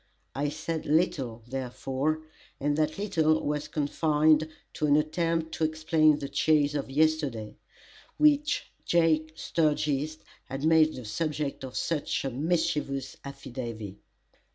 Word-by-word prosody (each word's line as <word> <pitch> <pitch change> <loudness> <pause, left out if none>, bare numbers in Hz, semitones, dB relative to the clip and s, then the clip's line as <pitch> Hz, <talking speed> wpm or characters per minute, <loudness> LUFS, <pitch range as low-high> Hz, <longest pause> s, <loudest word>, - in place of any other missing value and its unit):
I 145 +1 -1
said 155 +1 -4
little, 135 -8 +1
therefore, 135 +4 -2 0.4
and 145 +1 +1
that 155 0 0
little 160 -6 +2
was 150 0 -1
confined 155 +1 +2 0.2
to 150 - 0
an 145 - +5
attempt 160 +1 0
to - - -3
explain 155 -1 +3
the 140 - -5
chase 150 0 +2
of 140 -2 -3
yesterday, 145 -7 0 0.6
which 300 0 +3
Jake 160 -2 +2
Sturgis 155 -2 0 0.3
had 135 +3 -4
made 160 -1 +5
the 125 - -8
subject 150 +5 -2
of 130 -1 -6
such 155 -4 -1
a 135 - -1
mischievous 150 -1 -1
"affidavy." 115 -7 -7
150 Hz, 125 wpm, -28 LUFS, 140-160 Hz, 0.6 s, an